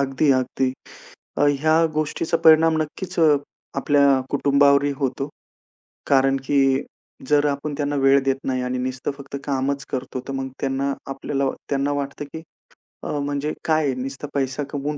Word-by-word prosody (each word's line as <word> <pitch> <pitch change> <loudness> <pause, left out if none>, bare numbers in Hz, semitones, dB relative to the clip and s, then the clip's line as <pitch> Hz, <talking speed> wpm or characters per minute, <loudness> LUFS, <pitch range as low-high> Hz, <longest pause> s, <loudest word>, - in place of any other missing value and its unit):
अगदी 140 +1 +2
अगदी. 130 0 0 0.7
अ, - - +1 0.2
ह्या 160 +2 +4
गोष्टीचा 155 +2 -1
परिणाम 160 0 +6
नक्कीच 175 +4 -6 0.6
आपल्या 140 -2 +4
कुटुंबावरही 140 0 +3
होतो. 135 0 -2 0.8
कारण 135 0 +3
की 145 - +2 0.7
जर 150 0 +4
आपण 140 +1 -4
त्यांना 145 -1 -1
वेळ 135 0 +5
देत 135 0 +2
नाही 130 -1 0
आणि 125 0 -2
नुसतं 130 +2 -3
फक्त 140 0 -7
कामच 135 0 -1
करतो 130 0 -4
तर - - -3
मग 135 0 -3
त्यांना 135 +1 -1 0.2
आपल्याला 135 0 -2 0.2
त्यांना 140 0 0
वाटतं, 140 +1 -3
की 160 +3 -9 0.6
अ, - - -4
म्हणजे 145 +1 -2
काय 155 -4 +2
नुसता 135 +3 -5
पैसा 135 +1 -1
कमवून 145 +1 -3
140 Hz, 145 wpm, -22 LUFS, 135-145 Hz, 0.8 s, परिणाम